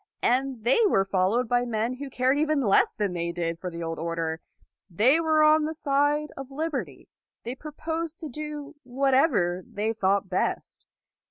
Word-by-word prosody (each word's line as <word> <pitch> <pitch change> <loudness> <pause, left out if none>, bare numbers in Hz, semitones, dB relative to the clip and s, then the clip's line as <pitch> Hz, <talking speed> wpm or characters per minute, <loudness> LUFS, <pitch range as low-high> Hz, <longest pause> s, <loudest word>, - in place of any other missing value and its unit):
And 255 -1 +1
they 245 - +3
were 195 - +2
followed 195 +6 +1
by 245 +1 +2
men 235 +1 -2
who 280 +1 -6
cared 255 +1 +1
even 310 -1 +1
less 210 -7 +3
than 205 -4 -1
they 170 -1 -2
did 170 -1 -3
for 180 - -4
the 170 -1 -6
old 165 0 -4
order. 165 -1 -3 0.5
They 230 - +4
were 315 -1 +3
on 305 0 +5
the 315 +1 -4
side 290 +1 +1
of 270 -1 -8
liberty. 270 - -4 0.4
They 240 - -4
proposed 320 +3 -5
to 320 - -5
do 300 +1 -7
whatever 255 - +1
they 215 +5 -3
thought 200 -2 +1
best. 185 0 -3
250 Hz, 170 wpm, -26 LUFS, 190-295 Hz, 0.5 s, on